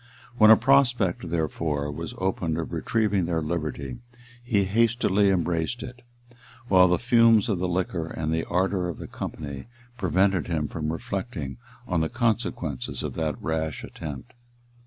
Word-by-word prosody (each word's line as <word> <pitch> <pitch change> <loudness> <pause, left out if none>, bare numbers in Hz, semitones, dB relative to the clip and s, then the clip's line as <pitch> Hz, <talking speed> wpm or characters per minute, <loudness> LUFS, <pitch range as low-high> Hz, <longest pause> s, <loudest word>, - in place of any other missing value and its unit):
When 110 -1 +8
a 110 - +9
prospect, 120 -11 +2
therefore, 80 -3 -1
was 70 - -6
opened 90 -4 -1
of 85 +1 -4
retrieving 100 +2 +1
their 85 -1 0
liberty, 75 -5 -3 0.4
he 110 -5 +2
hastily 105 -1 +2
embraced 85 +4 0
it; 125 0 -9 0.7
while 90 -1 +7
the 90 0 +3
fumes 115 -1 +4
of 100 -6 0
the 90 - 0
liquor 90 -2 -1
and 80 -1 -3
the 80 0 0
ardor 90 0 0
of 85 - -5
the - - -7
company 70 +2 -6 0.3
prevented 95 -2 +2
him 80 -4 -1
from 75 0 -3
reflecting 85 - -4 0.3
on 85 -2 +1
the 80 - 0
consequences 105 - -2
of - - -3
that 80 -3 -2
rash 80 0 -2
attempt. 80 - -8
90 Hz, 150 wpm, -26 LUFS, 80-105 Hz, 0.7 s, a